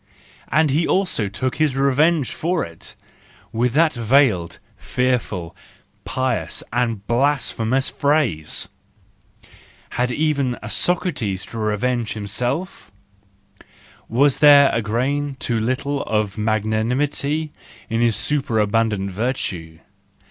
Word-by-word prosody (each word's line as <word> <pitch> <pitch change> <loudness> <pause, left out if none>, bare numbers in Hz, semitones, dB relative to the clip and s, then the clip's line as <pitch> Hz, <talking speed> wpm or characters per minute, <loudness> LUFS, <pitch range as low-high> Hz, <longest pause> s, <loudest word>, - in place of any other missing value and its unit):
And 155 -2 +2
he 160 +4 +1
also 185 - 0
took 125 +6 -3
his 155 -4 +1
revenge 140 +2 +2
for 175 +1 -1
it—with 115 +7 -6
that 160 +2 +3
veiled, 115 -7 +2 0.2
fearful, 115 -9 -2 0.5
pious, 130 0 -2
and 115 -4 -1
blasphemous 130 0 +1
phrase! 140 - 0 1.2
Had 125 +1 0
even 140 -3 0
a - - -5
Socrates 130 - 0
to 115 - -8
revenge 110 +2 -1
himself? 125 - -4 1.2
Was 135 +4 +3
there 145 -2 +7
a 115 - +1
grain 135 +6 -1
too 115 -2 -1
little 130 +5 -1
of 105 -3 -1
magnanimity 120 +8 0 0.4
in 115 0 -1
his 115 -2 +3
superabundant 110 -6 0
virtue 90 -7 -3
125 Hz, 100 wpm, -21 LUFS, 110-145 Hz, 1.2 s, there